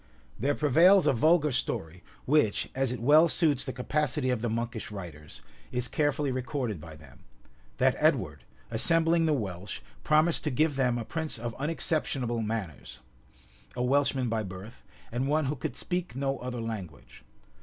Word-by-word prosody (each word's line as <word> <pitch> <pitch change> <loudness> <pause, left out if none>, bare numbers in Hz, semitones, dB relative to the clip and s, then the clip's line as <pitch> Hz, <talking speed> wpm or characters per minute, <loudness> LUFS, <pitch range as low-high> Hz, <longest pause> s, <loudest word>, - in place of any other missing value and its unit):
There 140 +6 +1
prevails 170 +7 +5
a - - +4
vulgar 155 +4 +3
story, 90 -8 -3 0.2
which, 140 -7 +2
as 135 -2 0
it 125 - -4
well 150 +7 +6
suits 155 -6 +2
the 130 - -3
capacity 130 +1 -1
of 125 -3 -1
the 120 - -1
monkish 115 0 -3
writers, 85 -7 -10 0.3
is 125 0 -1
carefully 145 +1 0
recorded 125 - -3
by 80 0 -10
them; 75 -4 -16 0.6
that - - +3
Edward, - - +1 0.3
assembling 165 +7 +3
the 155 - +3
Welsh, 100 -6 -4 0.2
promised 155 +2 +3
to - - +1
give 150 +2 +1
them 125 -3 +1
a 115 - -4
prince 160 0 -3
of 115 0 -5
unexceptionable 140 -6 -1
manners, 80 - -5 0.8
a 125 - -1
Welshman 135 0 +2
by 115 -1 -1
birth, 95 +3 -9 0.3
and 125 +3 -1
one 155 +1 +1
who 140 +3 -1
could 135 -1 -5
speak 180 -4 -4
no 135 0 -1
other 125 -1 -5
language. 100 -10 -7
125 Hz, 160 wpm, -28 LUFS, 110-150 Hz, 0.8 s, well